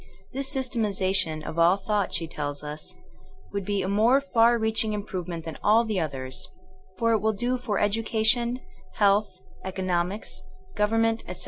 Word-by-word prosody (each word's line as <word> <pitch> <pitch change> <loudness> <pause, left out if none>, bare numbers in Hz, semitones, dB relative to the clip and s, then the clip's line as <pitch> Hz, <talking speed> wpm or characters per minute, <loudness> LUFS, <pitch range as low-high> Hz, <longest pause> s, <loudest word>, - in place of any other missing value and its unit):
' - - -27
' - - -27
* - - -31
' - - -30
This 270 +1 -1
systematiza 215 -8 0
tion 160 -5 +1
of 160 - -5
all 175 +3 +5
thought, 200 0 -1
she 165 -1 +1
teUs 145 -2 -5
us, 150 +1 -7 0.6
would 200 -1 -2
be 200 0 -1
a - - -2
more 220 +7 +4
far 240 -4 +3
reaching 220 -1 0
improvement 180 -5 -4
than 160 -2 -7
all 225 +3 +4
the 215 -4 -1
others, 130 -5 -4 0.5
for 230 +2 +2
it 220 - +3
will 220 +1 +1
do 245 +4 0
for 225 -5 -2
education, 225 +3 +1 0.3
health, 205 0 +3 0.3
economics, 185 +1 -2 0.3
government, 225 +2 +2
etc. 180 0 -7
205 Hz, 180 wpm, -26 LUFS, 180-225 Hz, 0.6 s, all